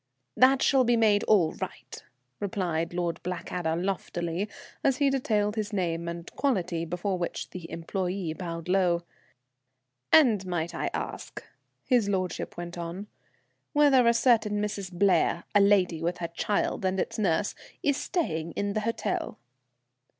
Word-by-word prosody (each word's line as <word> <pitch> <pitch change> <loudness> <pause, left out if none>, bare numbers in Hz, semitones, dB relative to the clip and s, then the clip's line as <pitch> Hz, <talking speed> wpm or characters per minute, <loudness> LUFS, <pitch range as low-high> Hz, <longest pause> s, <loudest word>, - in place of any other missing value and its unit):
"That 265 +1 +5
shall 265 -2 +4
be 240 -1 +3
made 210 -2 +4
all 180 -7 +4
right," - - -7 0.4
replied 180 -5 -1
Lord 175 -1 -2
Blackadder 175 -2 -3
loftily, 175 0 -2 0.3
as 270 -2 +3
he 280 -1 +3
detailed 210 -6 +1
his 215 -1 -2
name 170 -4 -1
and 170 0 -5
quality, 185 - 0
before 180 +3 -2
which 175 - -4
the 180 -3 -7
employé 180 0 -3
bowed 170 -2 -6
low. 180 -2 +2 1.1
"And 240 -11 +6
might 170 -2 -2
I - - -2
ask," - - -5 0.4
his 240 -6 +3
lordship 185 -3 -2
went 175 0 -6
on, 175 +5 -6 0.6
"whether 280 -5 +5
a 235 - +6
certain 220 -4 +3
Mrs. 205 -2 -3
Blair, 175 -2 +2
a 205 - +6
lady 190 -5 +3
with 175 +2 -1
her 170 -2 -4
child 200 +4 -1
and 190 0 0
its - - -2
nurse, 195 0 +1 0.3
is 285 -1 +3
staying 170 - -2
in 200 0 -2
the 215 - 0
hotel?" 230 +2 -2
190 Hz, 145 wpm, -28 LUFS, 170-215 Hz, 1.1 s, And